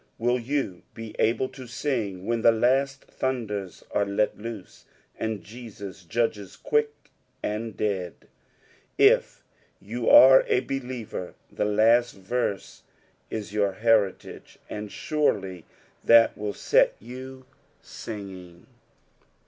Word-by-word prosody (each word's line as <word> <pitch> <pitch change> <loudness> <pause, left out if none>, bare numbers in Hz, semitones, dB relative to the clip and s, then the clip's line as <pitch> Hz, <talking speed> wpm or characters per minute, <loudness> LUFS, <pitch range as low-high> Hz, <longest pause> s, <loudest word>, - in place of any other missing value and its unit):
Will 120 +2 +1
you 125 -7 -2
be 115 -1 -8
able 120 +3 +2
to 130 -2 -11
sing 115 -7 -3
when 115 +1 0
the 115 - +6
last 135 +4 +1
thunders 105 -8 -4
are 105 - +2
let 100 +1 0
loose, 110 -3 -9 0.3
and 110 -4 -3
Jesua 100 -3 -10
judges 105 -3 -1
quick 445 0 -1 0.3
and 110 +1 -3
dead? 95 -5 -2 0.8
If - - +4 0.4
you 115 +4 -2
are 130 +1 +9
a 125 - +2
believer, 125 -8 -5 0.2
the - - -1
last 110 +2 +3
veiBd 100 0 -3 0.5
is 105 -2 -5
your 100 -2 +1
heritage, 110 -2 0
and 105 0 -6
surely 100 - -1 0.4
that 115 0 +6
will 105 -1 -4
set - - +3
you 130 +3 -10 0.4
singing. 95 -5 -9
110 Hz, 115 wpm, -26 LUFS, 100-125 Hz, 0.8 s, are